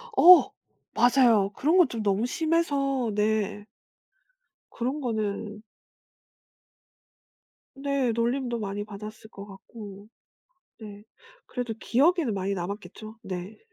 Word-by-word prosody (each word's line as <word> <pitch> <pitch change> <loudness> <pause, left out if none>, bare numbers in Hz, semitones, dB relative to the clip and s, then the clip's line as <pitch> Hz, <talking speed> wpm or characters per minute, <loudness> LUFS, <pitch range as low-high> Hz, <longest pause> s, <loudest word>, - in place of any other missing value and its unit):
어. 360 0 +8 0.4
맞아요. 235 -4 +4
그런 315 +6 +1
것 350 -8 +5
좀 230 -2 -4
너무 205 +2 0
심해서 280 -5 0
네. 210 0 -1 1.0
그런 255 +5 -3
거는 215 -2 -3 2.1
네. 275 -2 -1
놀림도 240 +1 -1
많이 205 -1 -4
받았을 215 +1 -10
것 200 -2 -10
같고. 200 0 -12 0.7
네. 205 -1 -11 0.4
그래도 245 -3 -4
기억에는 290 - +2
많이 195 0 -2
남았겠죠. 205 +4 -7
네. 185 +2 -7
220 Hz, 195 characters per minute, -26 LUFS, 205-265 Hz, 2.1 s, 어